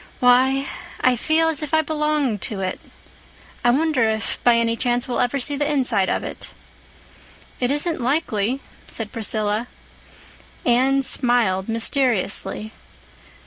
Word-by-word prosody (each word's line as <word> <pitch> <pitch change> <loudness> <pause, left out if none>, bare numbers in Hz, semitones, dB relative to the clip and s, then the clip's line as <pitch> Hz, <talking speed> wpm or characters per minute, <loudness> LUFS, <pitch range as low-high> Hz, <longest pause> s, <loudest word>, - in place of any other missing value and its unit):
"Why, 260 +2 +4 0.4
I 255 -1 +4
feel 315 +6 +2
as 320 -2 +1
if 300 +1 -1
I 315 - +3
belonged 300 - -1
to 210 - -5
it. 185 -1 -3 0.8
I 240 - +4
wonder 270 -3 +2
if, 220 -1 -3
by 240 -1 +5
any 230 0 +1
chance, 245 0 0
we'll 245 - -2
ever 245 +3 +1
see 280 +2 +1
the 290 +1 -1
inside 245 -9 +1
of - - -1
it." - - -8 1.0
"It 245 - 0
isn't 295 +1 0
likely," 255 -2 0 0.3
said 220 -2 -2
Priscilla. 215 0 -1 1.0
Anne 265 +3 +3
smiled 235 -8 +1
mysteriously. 225 -3 0
245 Hz, 135 wpm, -21 LUFS, 225-280 Hz, 1.0 s, by